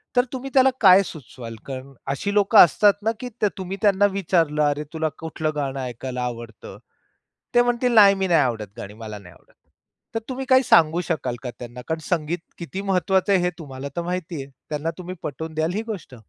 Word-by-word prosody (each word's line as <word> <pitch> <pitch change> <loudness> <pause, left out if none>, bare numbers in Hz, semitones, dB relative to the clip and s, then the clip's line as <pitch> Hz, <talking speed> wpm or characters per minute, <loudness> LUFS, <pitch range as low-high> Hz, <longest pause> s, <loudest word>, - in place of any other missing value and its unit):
तर 245 - +5
तुम्ही 265 +1 -5
त्याला 265 0 +6
काय 190 -2 +8
सुचवाल? 125 -8 -9
कारण 135 0 -7 0.2
अशी 200 +9 -2
लोकं 205 +1 +3
असतात 200 +4 +7
ना, 220 - +2
की 250 - -5
त्या 210 - +3
तुम्ही 190 0 -5
त्यांना 205 -2 +4
विचारलं, 165 -6 +1
"अरे, 145 +1 0
तुला 160 -1 -1
कुठलं 160 -1 -3
गाणं 140 -2 -2
ऐकायला 125 0 -5
आवडतं?" 120 -3 -7 0.8
ते 240 - +7
म्हणतील, 245 0 +1
"नाही, 200 -3 +7
मी 190 0 -1
नाही 170 -3 +4
आवडत 115 -5 -1
गाणी 105 -3 -8
मला 110 -1 -8
नाही 90 -3 -15
आवडत." - - -25 0.6
तर - - +1
तुम्ही 265 +1 -4
काही 260 0 +6
सांगू 170 -5 +4
शकाल 130 -7 -1
का 125 - -4
त्यांना 120 0 -8
कारण 160 0 -2
संगीत 170 0 -1 0.2
किती 185 +3 -5
महत्वाचं 190 0 +1
आहे 185 - +4
हे 180 - +2
तुम्हाला 140 -3 -7
तर 170 - -1
माहिती 175 -3 -4
आहे. 135 - -15 0.2
त्यांना 155 +2 -2
तुम्ही 180 +1 -6
पटवून 160 +3 -5
द्याल 160 +2 0
ही 215 - 0
गोष्ट? 195 - -7
165 Hz, 200 wpm, -23 LUFS, 135-195 Hz, 0.8 s, काय